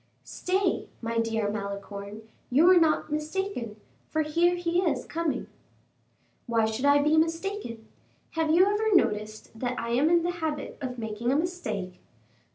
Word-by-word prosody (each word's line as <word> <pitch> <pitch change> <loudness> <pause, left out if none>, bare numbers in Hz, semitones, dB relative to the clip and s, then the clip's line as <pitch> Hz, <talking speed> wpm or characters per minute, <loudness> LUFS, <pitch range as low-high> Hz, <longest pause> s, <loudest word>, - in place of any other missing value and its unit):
"Stay, 375 0 -1
my 230 0 -2
dear 225 -2 0
Malicorne, 200 +1 -6 0.3
you 285 +7 +5
were 365 0 +7
not 315 -2 +2
mistaken, 305 - -3 0.3
for 315 - +1
here 340 +4 +2
he 350 0 0
is 300 -9 0
coming." 330 -2 -2 1.0
"Why 230 -2 +2
should 220 +5 -2
I 285 0 +5
be 305 +2 +3
mistaken? 330 - -1 0.4
Have 320 -1 0
you 345 +4 +6
ever 415 +1 +2
noticed 215 - 0
that 250 0 -2
I 230 - -4
am 260 +7 +3
in 340 0 +4
the 350 - 0
habit 315 -4 -4
of 255 -2 -4
making 225 +1 -2
a - - +2
mistake? 225 - -3
300 Hz, 155 wpm, -27 LUFS, 225-345 Hz, 1.0 s, were